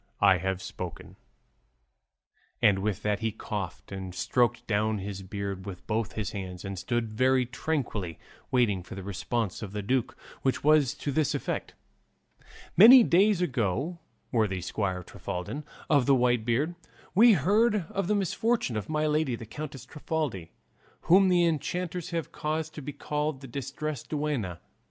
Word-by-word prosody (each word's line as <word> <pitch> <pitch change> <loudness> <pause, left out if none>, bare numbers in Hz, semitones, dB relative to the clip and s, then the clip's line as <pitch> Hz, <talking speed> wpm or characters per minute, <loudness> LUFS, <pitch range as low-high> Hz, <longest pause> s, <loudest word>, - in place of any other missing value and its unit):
I 95 -3 +5
have 95 +1 -2
spoken." - - -7 1.4
And 100 -2 +4
with 100 -1 -2
that 105 -1 +1
he 110 0 -1
coughed, 100 -6 -6
and 95 -2 -6
stroked 120 +1 +1
down 110 0 +1
his 100 0 -5
beard 100 0 -5
with 90 -2 -8
both 110 0 -1
his 105 -4 -3
hands, 95 -1 -6
and 100 -2 -4
stood 115 +1 -2
very 130 +2 +3
tranquilly 120 - -3 0.3
waiting 120 -8 +2
for 90 - -10
the 95 - -7
response 100 +2 -2
of 105 -3 -6
the 105 -1 -3
duke, 125 +3 0 0.2
which 130 - 0
was 150 -4 +4
to 145 - -3
this 150 +1 +1
effect: - - -3 1.0
"Many 235 +7 +10
days 195 0 +4
ago, 135 - -1 0.3
worthy 105 -6 +1
squire 95 0 -2
Trifaldin 90 - -5 0.2
of 140 -4 +3
the 140 - +6
White 120 -3 +2
Beard, 135 +8 +1 0.4
we 230 +4 +7
heard 205 - +3
of 195 -2 -1
the 210 - +2
misfortune 205 - 0
of 105 -2 -4
my 155 0 +1
lady 150 -4 +1
the 115 - -8
Countess 135 +2 -7
Trifaldi, 150 - -3 0.5
whom 190 +2 +5
the 175 -1 +4
enchanters 170 +2 -2
have 165 -2 -3
caused 155 +1 -3
to 150 - -7
be 145 +1 -5
called 150 0 -3
the 135 - -8
Distressed 140 +2 -5
Duenna. 145 - -2
125 Hz, 155 wpm, -28 LUFS, 100-155 Hz, 1.4 s, Many